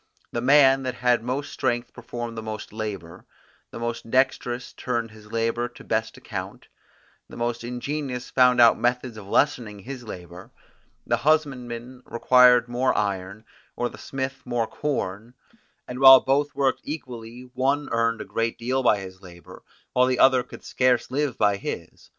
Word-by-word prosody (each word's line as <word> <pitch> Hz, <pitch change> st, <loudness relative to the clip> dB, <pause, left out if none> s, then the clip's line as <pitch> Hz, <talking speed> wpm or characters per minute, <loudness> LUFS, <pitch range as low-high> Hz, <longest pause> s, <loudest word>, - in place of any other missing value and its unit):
The 120 Hz, -, -2 dB
man 135 Hz, 0 st, +5 dB
that 130 Hz, -1 st, -3 dB
had 125 Hz, -1 st, +2 dB
most 130 Hz, +4 st, -4 dB
strength 120 Hz, 0 st, -2 dB
performed 120 Hz, -2 st, -6 dB
most 110 Hz, -1 st, -7 dB
labour; 100 Hz, -6 st, -6 dB, 0.4 s
the -, -, -9 dB
most 115 Hz, 0 st, -4 dB
dexterous 130 Hz, -1 st, 0 dB
turned 115 Hz, -3 st, -3 dB
his 105 Hz, 0 st, -15 dB
labour 115 Hz, +1 st, 0 dB
to 115 Hz, -, -15 dB
best 110 Hz, 0 st, -2 dB
account; -, -, -7 dB, 0.6 s
the -, -, -11 dB
most 120 Hz, 0 st, -2 dB
ingenious 125 Hz, +1 st, -4 dB
found 125 Hz, -1 st, +4 dB
out 115 Hz, -1 st, +6 dB
methods 125 Hz, -1 st, -1 dB
of 105 Hz, -2 st, -10 dB
lessening 115 Hz, -4 st, +1 dB
his 125 Hz, +5 st, -8 dB
labour; 90 Hz, -4 st, -10 dB, 0.6 s
the -, -, +1 dB
husbandman 130 Hz, -4 st, -1 dB
required 125 Hz, 0 st, +5 dB
more 125 Hz, +2 st, 0 dB
iron, 100 Hz, +1 st, -3 dB, 0.3 s
or 120 Hz, 0 st, -1 dB
the -, -, -13 dB
smith 135 Hz, -1 st, -5 dB
more 120 Hz, -2 st, -1 dB
corn, 115 Hz, -4 st, -4 dB, 0.5 s
and 125 Hz, 0 st, -6 dB
while 135 Hz, -1 st, +10 dB
both 145 Hz, +2 st, 0 dB
worked 135 Hz, -1 st, +1 dB
equally, 125 Hz, -4 st, -8 dB
one 140 Hz, +3 st, 0 dB
earned 115 Hz, -1 st, +1 dB
a -, -, -6 dB
great 115 Hz, 0 st, -2 dB
deal 130 Hz, +3 st, -1 dB
by 120 Hz, -4 st, +4 dB
his 95 Hz, 0 st, -10 dB
labour, 85 Hz, -2 st, -13 dB, 0.3 s
while 125 Hz, 0 st, +4 dB
the 130 Hz, -1 st, +1 dB
other 130 Hz, 0 st, +5 dB
could -, -, -12 dB
scarce 125 Hz, -2 st, +1 dB
live 140 Hz, -1 st, -1 dB
by 100 Hz, -1 st, +2 dB
his. -, -, -7 dB
120 Hz, 160 wpm, -24 LUFS, 115-130 Hz, 0.6 s, while